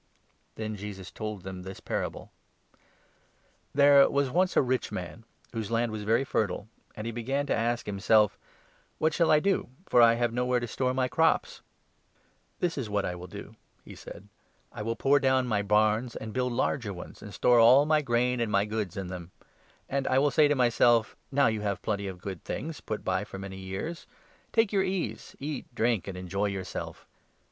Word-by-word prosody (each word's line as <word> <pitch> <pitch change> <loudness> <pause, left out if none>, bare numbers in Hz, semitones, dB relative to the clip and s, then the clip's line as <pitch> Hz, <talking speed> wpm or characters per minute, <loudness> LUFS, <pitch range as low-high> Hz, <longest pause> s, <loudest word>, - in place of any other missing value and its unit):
Then 110 -1 -4
Jesus 100 -2 -8
told 105 -4 -6
them 95 -1 -7
this 95 +1 -8
parable - - -4 0.5
— - - -35
" - - -36
There 140 -1 +7
was 140 -2 +1
once 180 +4 +2
a - - +7
rich 130 0 -1
man 95 +5 -6 0.3
whose 110 -3 -3
land 115 0 0
was 105 -1 -5
very 115 +5 +3
fertile; 105 -5 -1 0.3
and 105 - -6
he 115 - -2
began 135 +5 -2
to - - 0
ask 120 +1 -1
himself 105 +1 +3 0.3
' - - -36
What 155 0 +1
shall 165 +1 +2
I 155 - +6
do, 195 -3 0 0.2
for 120 - +4
I 115 0 +7
have 120 -1 0
nowhere 125 0 +1
to 120 - -3
store 125 +2 -1
my 130 -1 +1
crops? 160 +5 +1 1.0
This 170 -4 0
is 120 -5 -4
what 100 -1 0
I 90 - -2
will 90 +1 -8
do,' - - -10 0.3
he - - -10
said; 100 - -11 0.2
' - - -40
I - - -6
will 115 +2 -2
pull 140 +4 +3
down 130 -1 +2
my 105 -4 0
barns 105 +3 +2
and 110 -1 -6
build 125 -1 0
larger 120 -3 -1
ones, 90 - -10
and 105 - -9
store 120 +3 +4
all 125 +5 +7
my 155 0 +3
grain 125 -1 +1
and 115 -2 -1
my 100 0 +3
goods 105 -4 -3
in 95 - -3
them; 90 -1 -7 0.6
and 135 -1 -1
I 130 - +2
will 145 +1 +3
say 150 +3 +5
to 145 - +2
myself, 120 -2 +3 0.2
Now 140 +1 +3
you 110 -2 +1
have 100 -3 -2
plenty 100 -2 -2
of 95 -1 -6
good 95 -3 -6
things 160 +2 -5
put 110 - -4
by 95 0 0
for - - -9
many 95 0 -7
years; 95 - -5 0.4
take 225 -2 +2
your 195 - +3
ease, 185 -1 -3
eat, 145 -1 -5
drink, 115 -4 +1
and 95 -2 -5
enjoy 95 +3 -2
yourself.' 95 -2 -5
115 Hz, 205 wpm, -28 LUFS, 100-135 Hz, 1.0 s, There